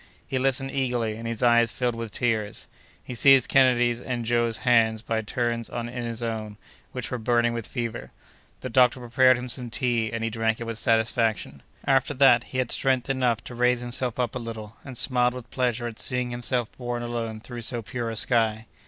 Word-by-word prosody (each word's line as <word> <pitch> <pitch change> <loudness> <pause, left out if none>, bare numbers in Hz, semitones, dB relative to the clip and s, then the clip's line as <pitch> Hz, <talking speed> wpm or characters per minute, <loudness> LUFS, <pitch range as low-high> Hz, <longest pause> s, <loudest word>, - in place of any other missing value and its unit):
He 130 - -2
listened 135 0 +1
eagerly, 125 -5 -1
and 115 +1 -6
his 115 +1 -3
eyes 120 -1 +4
filled 125 -1 -1
with 115 -2 -5
tears. 110 -3 -2 0.4
He - - -7
seized 135 +1 +5
Kennedy's 120 -3 +3
and 120 -2 -3
Joe's 120 -1 +1
hands 115 -2 +3
by 115 -2 -1
turns 115 +1 -2
in 120 - -4
his 120 -1 -4
own, 110 -2 -4 0.3
which 125 -3 -5
were 125 - -2
burning 120 +1 +2
with 115 -2 -4
fever. 120 -3 -4 0.5
The 130 - -5
doctor 125 +1 +4
prepared 130 +1 +4
him 125 +1 -5
some 125 0 -3
tea, 120 -2 0
and 115 0 -3
he 115 - -1
drank 110 0 0
it - - -4
with 115 -1 -4
satisfaction. 110 - +1 0.2
After 135 +1 +2
that, 125 -3 +5
he 130 - -6
had 130 -2 0
strength 130 -1 +1
enough 125 -4 0
to - - -8
raise 125 0 +2
himself 125 0 -2
up 120 -2 0
a 125 - -3
little, 115 -2 -7
and 130 -3 -8
smiled 125 0 +1
with 125 -2 -9
pleasure 125 -2 -1
at 115 -2 -6
seeing 125 -1 -1
himself 120 -1 -2
borne 120 -1 -3
along 115 -2 -4
through 120 +1 -8
so 115 0 -2
pure 120 +1 -4
a 115 - -4
sky. 110 -1 +1
120 Hz, 200 wpm, -25 LUFS, 115-125 Hz, 0.5 s, seized